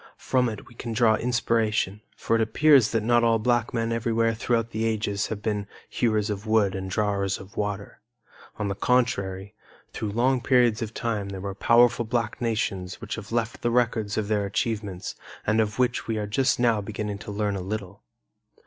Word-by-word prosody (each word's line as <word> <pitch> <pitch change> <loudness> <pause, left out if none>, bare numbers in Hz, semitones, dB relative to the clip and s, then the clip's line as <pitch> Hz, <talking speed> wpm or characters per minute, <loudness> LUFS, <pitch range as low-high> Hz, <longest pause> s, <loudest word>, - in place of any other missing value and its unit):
From 125 -2 +1
it 110 -2 -7
we - - -15
can 115 0 -5
draw 110 -1 +4
inspiration; 110 -4 0 0.2
for 115 - 0
it 115 - +2
appears 130 +2 +5
that 115 -2 0
not 120 +1 +3
all 115 -1 +4
black 120 +1 +1
men 115 -1 -1
everywhere 115 0 +1
throughout 115 0 -1
the 110 +1 -2
ages 105 -2 -1
have 105 -1 -5
been 105 -2 -1 0.2
"hewers 110 -2 0
of 105 +1 -5
wood 110 -3 +3
and 95 0 -4
drawers 100 -1 0
of 95 +1 -13
water." 105 -1 -4 0.6
On 105 - -2
the 100 - -1
contrary, 100 -4 0 0.4
through 110 - -3
long 125 +3 +2
periods 120 -3 +3
of 115 -1 -4
time 105 -4 -2
there 95 -1 -6
were 100 +1 -4
powerful 120 +3 +4
black 115 +1 -2
nations 100 -6 -2
which 115 -2 -6
have 115 -2 -7
left 115 -1 -1
the 120 - +1
records 115 -4 +1
of 110 -2 -1
their 105 -2 0
achievements 100 -3 -3 0.3
and 110 +1 +3
of 105 -1 -2
which 125 -1 0
we 110 -1 -1
are 105 - -2
just 125 +6 +1
now 115 -3 +3
beginning 105 0 -4
to - - -9
learn 105 0 -1
a 95 - -3
little. 100 0 -5
110 Hz, 195 wpm, -26 LUFS, 100-115 Hz, 0.6 s, appears